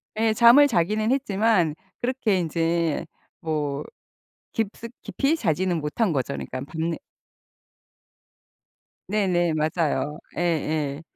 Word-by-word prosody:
네, 220 0 +2
잠을 240 +6 +7
자기는 215 +1 +1
했지만 215 - +2 0.3
그렇게 240 -6 +1
이제 165 -1 0 0.3
뭐 150 -3 -2 0.7
깊숙 225 +1 -3
깊이 280 +3 0
자지는 180 - 0
못 150 +8 -6
한거죠. 140 - +1
그러니까 130 - -5
밤내 160 +3 -3 2.1
네네, 180 -5 +1
맞아요. 155 -1 -1 0.2
예예. 155 -3 -1
170 Hz, 210 characters per minute, -24 LUFS, 155-215 Hz, 2.1 s, 잠을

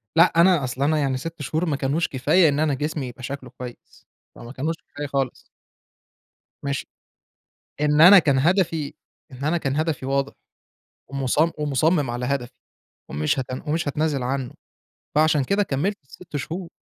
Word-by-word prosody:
لأ، 170 0 +5
أنا 175 -5 +4
أصل 130 +2 -2
أنا 155 +2 +2
يعني 135 -2 0
6 165 +2 -7
شهور 160 +5 -1
ما 150 -4 0
كانوش 145 +5 0
كفاية 155 +5 +3
إن 145 +1 0
أنا 155 -2 +2
جسمي 145 -1 -3
يبقى 125 +1 -10
شكله 135 -1 -6
كويس، 125 -1 -11 0.3
فما 120 +1 -10
كانوش 155 +5 -2
كفاية 145 0 -6
خالص. 135 -2 -2 1.2
ماشي، 140 -1 -2 1.0
إن 150 0 +3
أنا 190 +4 +10
كان 140 -5 +3
هدفي 165 -2 +1 0.4
إن 130 +2 -7
أنا 165 +3 +1
كان 135 -2 -2
هدفي 155 -4 -1
واضح 140 0 0 0.8
ومص 135 -2 -1 0.2
ومُصمِّم 150 -1 +1
على 120 +1 -3
هدفي 140 -4 -2 0.6
ومش 75 - 0
هات 130 - -2 0.2
ومش 155 0 -1
هاتنازل 145 -2 0
عنه، 130 0 -3 0.6
فعلشان 155 -2 +3
كده 200 +5 +1
كمّلت 190 +6 -1
ال6 165 +3 -10
شهور. 165 +5 -5
145 Hz, 155 wpm, -23 LUFS, 135-160 Hz, 1.2 s, أنا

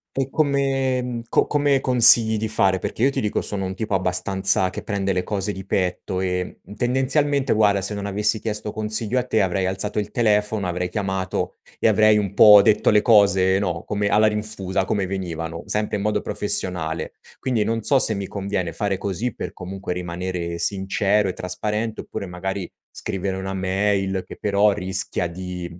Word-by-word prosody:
E 135 -1 -1
come 135 -3 0
mhmm, 120 -1 -5
co - - +2
come 145 -2 +1
consigli 115 -3 +7
di 110 - -2
fare, 95 -3 +2
perché 110 - -4
io, 140 - +4
ti - - -2
dico, 105 - -1
sono 100 -2 -3
un 95 0 -5
tipo 105 0 -4
abbastanza 95 +1 +3
che - - -6
prende 100 -2 -2
le 90 - 0
cose 105 0 -2
di 95 -1 -8
petto 95 0 -2
e, 90 -1 -3
mhmm, 100 - -12
tendenzialmente, 135 +4 0
guarda, 100 -3 +2
se 100 +2 +2
non 100 0 -5
avessi 105 +2 0
chiesto 105 -1 -3
consiglio 110 +3 -1
a 125 - -1
te, 110 - +1
avrei 95 0 -1
alzato 100 +3 -2
il 105 - -4
telefono, 105 -3 +1
avrei 90 +1 -3
chiamato 95 -1 -3 0.2
e - - +1
avrei 110 -1 +4
un 100 -2 -2
po' 105 0 +8
detto 110 0 +3
le 105 0 +3
cose, 100 -4 +4
no, 90 -4 -3
come 105 0 -1
alla 105 +2 +3
rinfusa, 105 -3 -2
come 95 0 -1
venivano, 85 -3 -5
sempre 105 0 -1
in - - -5
modo 105 +1 0
professionale. 90 -5 -2 0.2
Quindi 125 -5 -1
non 115 +1 -2
so 135 +5 +3
se 110 - +4
mi 100 0 -4
conviene 95 -4 -3
fare 100 -2 -1
così 100 +5 -3
per, - - -6
comunque, 95 0 -6
rimanere 90 -1 -4
sincero 100 +2 0
e - - -3
trasparente, 105 +5 -3
oppure - - -7
magari 95 +1 -5 0.2
scrivere 95 0 -4
una 95 0 -5
mail, 95 0 -1
che - - -11
però 105 0 +2
rischia 95 -2 -1
di 90 +1 -7
100 Hz, 185 wpm, -22 LUFS, 95-110 Hz, 0.2 s, po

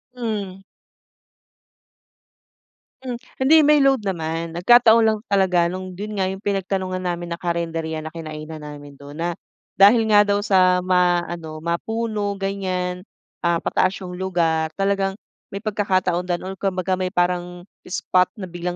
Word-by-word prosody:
Hmm. 205 -6 -4 2.4
Mm, 250 -2 -4 0.2
hindi 275 +5 +5
may 300 0 +5
load 270 -5 +3
naman. 165 -3 -3
Nagkataon 225 +6 +5
lang 220 -1 +1
talaga 180 -3 +3
nung 185 0 -6
dun 210 +1 -5
nga 190 - +1
yung 190 +2 -6
pinagtanungan 190 -2 -2
namin 175 -1 -4
na 170 - -4
karinderya 165 -2 -3
na 160 - -7
kinainan 155 -1 -7
namin 145 -1 -10
dun 145 +1 -11
na 175 -1 -3 0.4
dahil 225 +4 +7
nga 205 0 +6
daw 205 0 +1
sa 185 -2 +3
ma-ano, 175 -3 0
ma-puno 210 +3 -2
ganyan. 185 -1 -3 0.3
Ah, 170 -1 0
pataas 185 +1 +1
yung 180 0 -7
lugar 165 -4 0
talagang 195 0 0 0.3
may 200 +2 -7
pagkakataon 185 -4 0
daw 175 - +1
or 190 0 -7
kumbaga 185 -1 -1
may 185 - 0
parang 180 -1 -1 0.2
spot 180 0 +1
na 205 - -8
biglang 175 0 -4
185 Hz, 140 wpm, -22 LUFS, 170-200 Hz, 2.4 s, dahil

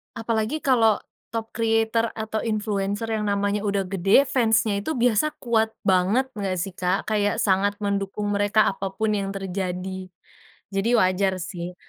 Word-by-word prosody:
Apalagi 225 +6 -2
kalo, 230 -5 +3 0.2
top 225 0 -5
creator 225 0 +1
atau 220 0 -3
influenser 210 0 -2
yang 215 -1 -1
namanya 200 0 0
udah 200 -1 +1
gede, 195 +7 +3
fans-nya 225 -5 +2
itu 315 +9 -3
biasa 245 +5 +2
kuat 225 -2 +1
banget 200 +8 +2
nggak 200 -4 -3
sih, 185 +2 -3
Kak? 180 +1 -1
Kayak 205 -1 +1
sangat 200 +1 +2
mendukung 200 +1 -1
mereka 205 +1 +3
apapun 195 +3 -2
yang 195 -1 -2
terjadi, 185 -1 -4 0.6
jadi 195 +3 0
wajar 185 0 +2
sih. 175 0 -6
205 Hz, 140 wpm, -24 LUFS, 195-225 Hz, 0.6 s, kalo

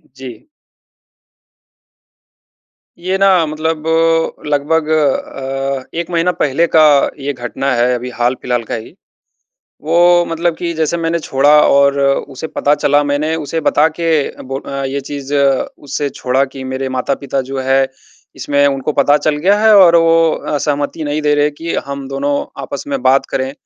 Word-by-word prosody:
जी। 130 - -10 2.5
ये 185 +2 -1
ना 190 -4 +3
मतलब 155 +1 -3 0.6
लगभग 150 +2 0
अ, 135 -2 -1
1 170 0 -3
महीना 170 +1 +1
पहले 165 +1 0
का 155 - +7 0.4
ये 140 +1 -3
घटना 125 +3 -3
है 120 +1 +2
अभी 125 +1 -5
हाल 120 +2 0
फिलहाल 120 -2 -1
का - - -5
ही, 110 - -9 0.9
वो 175 +2 +4
मतलब 165 0 -1
कि 170 -1 -3
जैसे 160 +1 -1
मैंने 165 0 -1
छोड़ा 140 -1 +1 0.2
और 140 0 +3
उसे 140 +1 -1
पता 145 +1 +1
चला 145 0 +2
मैंने 150 +3 -1
उसे 160 +1 -3
बता 150 0 +3
के 165 -1 -1 0.3
बो 135 +1 -5
अ, - - -10
ये 140 +1 -3
चीज़ 140 +1 -6
उसे 140 +1 -1
छोड़ा 130 +2 0
कि 135 0 -9
मेरे 130 0 -4
माता-पिता 135 +1 -2
जो 135 - -3
है 135 +1 +2 0.5
इसमें 145 0 +1
उनको 135 +1 -1
पता 145 +1 +3
चल 150 0 0
गया 195 +7 +2
है 220 -1 +5
और 170 -3 +7
वो 165 -1 +4
अ, 150 - -4
सहमति 145 +2 -2
नहीं 145 +1 -2
दे 150 0 +2
रहे 145 0 +2
कि 165 +3 -6
हम 140 -1 -6
दोनों 140 +1 -2 0.3
आपस - - -6
में 275 -2 -3
बात 135 +1 +3
करें। 130 0 -2
145 Hz, 160 wpm, -15 LUFS, 135-160 Hz, 2.5 s, का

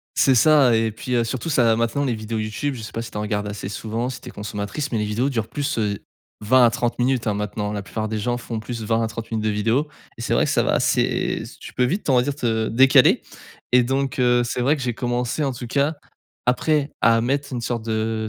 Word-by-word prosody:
C'est 135 - +4
ça 140 -2 +5
et 110 0 +1
puis, 125 +3 -4
heu, 120 - +3
surtout 120 +6 -3
ça 120 -6 +3
maintenant 115 +5 0
les 125 - 0
vidéos 110 0 -4
YouTube, 110 +6 -2
je 115 - -8
sais - - -7
pas 115 - -4
si 115 - -7
tu - - -7
en 105 - -2
regardes 105 -1 -2
assez 105 -1 -5
souvent, 115 +4 -3
si 130 - -7
tu - - -12
es - - -9
consommatrice 105 +7 -4
mais 115 - 0
les 105 - 0
vidéos 115 +6 0
durent 115 -5 -2
plus, 145 -3 -2
heu, 105 -2 0 0.4
20 125 +4 +4
à - - +6
30 120 +1 -2
minutes, 125 -1 +1
hein. 105 - +1
Maintenant, 105 0 -3
la 105 - -3
plupart 110 +2 -4
des 110 - -2
gens 120 +3 -1
font 115 -2 -5
plus 115 0 -6
20 115 +1 +1
à - - 0
30 115 +1 -7
minutes 110 -1 -1
de 110 - +1
vidéos 115 +8 +1 0.3
et - - -5
c'est - - 0
vrai - - +3
que - - -1
ça - - +3
va - - +1
assez - - +1 0.2
tu - - -10
peux 125 - +1
vite 185 +11 -2
on 130 - +4
va 125 - +5
dire 140 +2 -2
te 110 -5 0
décaler 130 +4 +5 0.5
et 125 0 +6
donc 135 +2 -1
heu, 120 -1 +4
c'est 120 +1 -2
vrai 140 +5 +3
que 140 - -5
j'ai 120 -2 -1
commencé 120 +4 -1
en 135 - 0
tout 125 -1 -7
cas 140 +6 0 0.5
après, 145 +4 +1
à 115 +1 +5
mettre 140 +3 -1
une 120 - -3
sorte 115 -1 -3
de 110 0 -1
115 Hz, 265 wpm, -22 LUFS, 110-130 Hz, 0.5 s, à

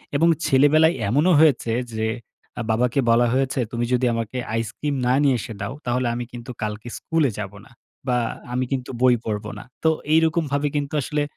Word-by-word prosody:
এবং 165 +4 +4 0.2
ছেলেবেলায় 155 +5 +4
এমনও 150 - +3
হয়েছে 140 -7 +3 0.2
যে, 110 0 -1 0.5
আ - - -1
বাবাকে 125 +4 +1
বলা 120 +1 +4
হয়েছে, 135 0 0
"তুমি 120 0 -1
যদি 125 0 +2
আমাকে 115 +2 -3 0.2
আইসক্রিম 115 +6 -2
না 125 - +3
নিয়ে 135 -3 +4
এসে 115 - -6
দাও, 100 +6 -3
তাহলে 125 0 0
আমি 120 0 -3
কিন্তু 120 +1 -8
কালকে 105 +2 -4
স্কুলে 160 -4 +1
যাব 95 -2 -4
না।" - - -19 0.4
বা, 125 -1 +2 0.4
"আমি 130 +1 0
কিন্তু 130 -2 -2
বই 125 -1 +6
পড়ব 105 -2 -3
না।" - - -9 0.2
তো 160 - +5 0.2
এইরকমভাবে 160 -3 +2
কিন্তু 145 +1 -2
আসলে 150 +2 -1
130 Hz, 180 wpm, -23 LUFS, 115-145 Hz, 0.5 s, বই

